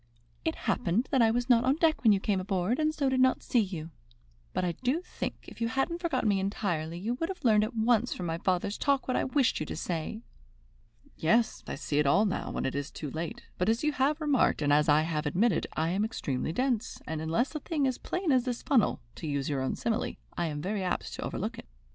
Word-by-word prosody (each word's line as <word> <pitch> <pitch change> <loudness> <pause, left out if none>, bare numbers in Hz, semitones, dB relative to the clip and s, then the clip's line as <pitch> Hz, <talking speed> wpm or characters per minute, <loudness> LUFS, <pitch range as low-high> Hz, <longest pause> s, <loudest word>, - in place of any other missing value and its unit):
"It 320 - 0
happened 225 +4 +1
that 265 - +4
I 225 - +6
was 240 +2 0
not 240 -2 +5
on 260 +2 +3
deck 320 0 +2
when 225 - +6
you 200 - +4
came 195 -1 0
aboard, 190 - 0
and 310 0 +2
so 295 -3 -1
did 260 -1 +1
not 260 0 +3
see 245 - +2
you. 175 -6 -3 0.6
But - - -1
I 175 - +1
do 255 - -1
think, - - -4
if - - -12
you 230 - +2
hadn't 270 +9 -1
forgotten 335 -9 0
me 200 -2 +3
entirely, 175 -5 -2
you 215 +7 -2
would 330 +7 -2
have 375 -7 -6
learned 215 -2 +5
at 225 +3 -3
once 230 +1 +2
from 180 - -3
my 165 0 -2
father's 185 +2 0
talk 280 -2 +1
what 255 - 0
I - - +2
wished 265 -1 +2
you 155 - -2
to - - -4
say." 170 +7 -4 0.9
"Yes, 225 +8 +2
I - - -3
see 145 0 -1
it 150 - +3
all 195 +10 +4
now, 195 - -2
when - - -3
it 130 - -1
is 140 0 -3
too 150 -4 -6
late; 160 +3 -5 0.2
but 180 +4 +2
as 225 +4 +1
you 300 - +3
have 290 +3 +1
remarked, 290 - +2
and 145 0 +3
as 150 +1 +4
I 150 +1 +6
have 155 -2 -1
admitted, 200 +10 +2
I 160 +1 +1
am 190 +4 +1
extremely 160 - -2
dense, 245 +3 -1
and 155 0 -3
unless 165 - 0
a 305 - -3
thing 300 -3 -1
is 260 - +2
as - - -12
plain 360 -3 -1
as 255 -2 +3
the 250 -2 -1
funnel 250 -2 +1 0.2
to 160 - -5
use 140 -1 -1
your 140 -2 -1
own 130 - -1
simile 225 -2 -1 0.2
I 175 - 0
am 150 -1 -4
very 200 +1 -1
apt 185 - -2
to - - -6
overlook - - -3
it. - - -11
215 Hz, 250 wpm, -29 LUFS, 165-260 Hz, 0.9 s, I